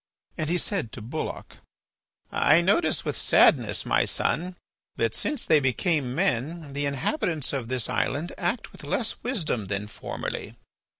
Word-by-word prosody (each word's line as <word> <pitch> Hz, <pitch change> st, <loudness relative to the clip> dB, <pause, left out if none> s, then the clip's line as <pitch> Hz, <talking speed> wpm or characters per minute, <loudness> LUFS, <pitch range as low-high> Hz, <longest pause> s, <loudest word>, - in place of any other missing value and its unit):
And 155 Hz, -1 st, -2 dB
he 175 Hz, -, +2 dB
said 175 Hz, -, -2 dB
to 120 Hz, -, -7 dB
Bulloch: 145 Hz, +8 st, -5 dB, 0.7 s
"I 155 Hz, -, +5 dB
notice 200 Hz, -, +2 dB
with -, -, -1 dB
sadness, -, -, +4 dB
my -, -, +3 dB
son, 180 Hz, +2 st, -1 dB, 0.4 s
that -, -, 0 dB
since 300 Hz, -, -1 dB
they 155 Hz, -2 st, +5 dB
became 135 Hz, -1 st, 0 dB
men 160 Hz, -2 st, -1 dB
the 145 Hz, 0 st, -1 dB
inhabitants 150 Hz, -, -1 dB
of 130 Hz, -4 st, -2 dB
this 125 Hz, -3 st, 0 dB
island 160 Hz, +5 st, -1 dB
act 190 Hz, +7 st, -2 dB
with -, -, -12 dB
less 230 Hz, -, -1 dB
wisdom 165 Hz, -, -1 dB
than 100 Hz, +1 st, -2 dB
formerly. 105 Hz, -, -5 dB
155 Hz, 145 wpm, -26 LUFS, 130-180 Hz, 0.7 s, I